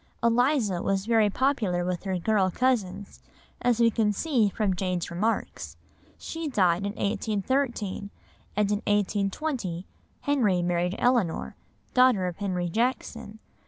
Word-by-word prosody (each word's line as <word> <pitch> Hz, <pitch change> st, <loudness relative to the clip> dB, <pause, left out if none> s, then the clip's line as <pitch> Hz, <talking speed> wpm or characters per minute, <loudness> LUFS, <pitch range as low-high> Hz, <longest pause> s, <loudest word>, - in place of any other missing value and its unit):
Eliza 235 Hz, -, +2 dB
was 195 Hz, 0 st, 0 dB
very 225 Hz, -2 st, +3 dB
popular 210 Hz, -8 st, 0 dB
with 180 Hz, +1 st, -3 dB
her 190 Hz, -1 st, -1 dB
girl 195 Hz, +1 st, +2 dB
cousins, 205 Hz, -4 st, -1 dB, 0.4 s
as 240 Hz, -1 st, +2 dB
we 230 Hz, -1 st, +5 dB
can 215 Hz, -1 st, +2 dB
see 230 Hz, -1 st, +1 dB
from 195 Hz, -1 st, 0 dB
Jane's 180 Hz, -2 st, -2 dB
remarks; 210 Hz, +7 st, -2 dB, 0.4 s
she 325 Hz, -1 st, -5 dB
died 190 Hz, -, +2 dB
in 200 Hz, -, -4 dB
1813, 215 Hz, 0 st, -1 dB, 0.5 s
and 210 Hz, 0 st, +1 dB
in 205 Hz, -, +2 dB
1820 205 Hz, -, -1 dB, 0.4 s
Henry 215 Hz, -11 st, +2 dB
married 175 Hz, +1 st, 0 dB
Eleanor, 195 Hz, -, +1 dB, 0.4 s
daughter 250 Hz, -7 st, +4 dB
of 180 Hz, -2 st, -4 dB
Henry 185 Hz, -3 st, -2 dB
Jackson. 225 Hz, +1 st, -2 dB
205 Hz, 125 wpm, -27 LUFS, 185-240 Hz, 0.5 s, we